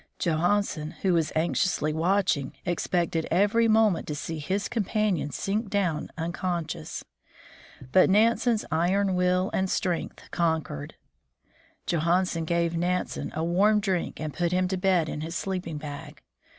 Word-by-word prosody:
Johan 175 Hz, +5 st, +2 dB
sen, 155 Hz, -5 st, -6 dB
who 190 Hz, -2 st, +3 dB
was 165 Hz, -2 st, +1 dB
anxiously 160 Hz, -1 st, +1 dB
watching, 170 Hz, -4 st, +1 dB
expected 175 Hz, -2 st, 0 dB
every 210 Hz, +4 st, +3 dB
moment 215 Hz, -5 st, +3 dB
to 150 Hz, -, -3 dB
see 160 Hz, +2 st, -5 dB
his 190 Hz, +7 st, -1 dB
companion 210 Hz, -8 st, 0 dB
sink 200 Hz, -, -2 dB
down 180 Hz, -7 st, 0 dB
unconscious. 170 Hz, -, -3 dB, 0.9 s
But 185 Hz, -, +5 dB
Nan 220 Hz, +4 st, +5 dB
sen's 230 Hz, -1 st, 0 dB
iron 185 Hz, +4 st, +2 dB
will 180 Hz, +1 st, +1 dB
and 190 Hz, 0 st, 0 dB
strength 180 Hz, -4 st, -2 dB
conquered. 160 Hz, -, -1 dB, 0.9 s
Johansen 170 Hz, 0 st, +1 dB
gave 170 Hz, 0 st, +1 dB
13° -, -, -8 dB
THE 165 Hz, -, -1 dB
FROZEN -, -, -1 dB
NORTH 180 Hz, +1 st, +2 dB, 0.3 s
Nansen -, -, -10 dB
a 160 Hz, -, -1 dB
warm 200 Hz, +6 st, +3 dB
drink, 190 Hz, -4 st, -2 dB
and 155 Hz, -2 st, -4 dB
put 175 Hz, -1 st, 0 dB
him 185 Hz, 0 st, +2 dB
to 190 Hz, -, -1 dB
bed 180 Hz, -3 st, +2 dB
in 150 Hz, -, -4 dB
his 165 Hz, +2 st, -5 dB
sleeping 180 Hz, -5 st, -3 dB
bag. 145 Hz, -1 st, -8 dB
175 Hz, 155 wpm, -27 LUFS, 160-195 Hz, 0.9 s, But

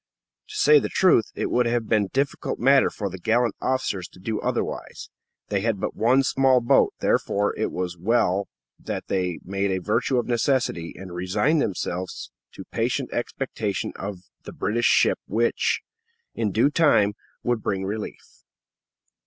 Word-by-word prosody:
To -, -, -10 dB
say 150 Hz, 0 st, +6 dB
the -, -, -3 dB
truth, 180 Hz, -, +4 dB
it -, -, -2 dB
would 120 Hz, -1 st, +2 dB
have 115 Hz, -1 st, 0 dB
been 105 Hz, -2 st, +2 dB
a -, -, -10 dB
difficult 140 Hz, +4 st, -1 dB
matter 135 Hz, +3 st, +4 dB
for 100 Hz, -, -4 dB
the 95 Hz, -1 st, -7 dB
gallant 115 Hz, +4 st, +1 dB
officers 130 Hz, -9 st, -1 dB
to -, -, -18 dB
do 105 Hz, +3 st, -3 dB
otherwise; -, -, -3 dB, 0.4 s
they 100 Hz, -2 st, 0 dB
had 110 Hz, -2 st, 0 dB
but -, -, -3 dB
one 125 Hz, +5 st, +3 dB
small 130 Hz, -1 st, +3 dB
boat; 120 Hz, -, +3 dB
therefore, 100 Hz, +1 st, +1 dB
it 110 Hz, -, -2 dB
was 90 Hz, -1 st, -4 dB
well 100 Hz, -1 st, +1 dB, 0.3 s
that -, -, -5 dB
they 90 Hz, -3 st, -1 dB
made 100 Hz, +1 st, -1 dB
a 95 Hz, -, 0 dB
virtue 115 Hz, +7 st, 0 dB
of 120 Hz, -, +1 dB
necessity, 120 Hz, -8 st, 0 dB
and 95 Hz, -1 st, -9 dB
resigned 95 Hz, -, +1 dB
themselves 90 Hz, -2 st, -3 dB, 0.2 s
to -, -, -9 dB
patient -, -, -1 dB
expectation -, -, -3 dB
of 95 Hz, -2 st, -6 dB, 0.2 s
the -, -, -10 dB
British 120 Hz, +3 st, 0 dB
ship -, -, +3 dB
which, 115 Hz, +4 st, +1 dB, 0.5 s
in 110 Hz, -3 st, -1 dB
due 115 Hz, +8 st, +3 dB
time, 145 Hz, -11 st, +4 dB, 0.3 s
would 120 Hz, -2 st, 0 dB
bring 95 Hz, -2 st, -2 dB
relief. 105 Hz, +2 st, -7 dB
110 Hz, 160 wpm, -24 LUFS, 95-120 Hz, 0.5 s, say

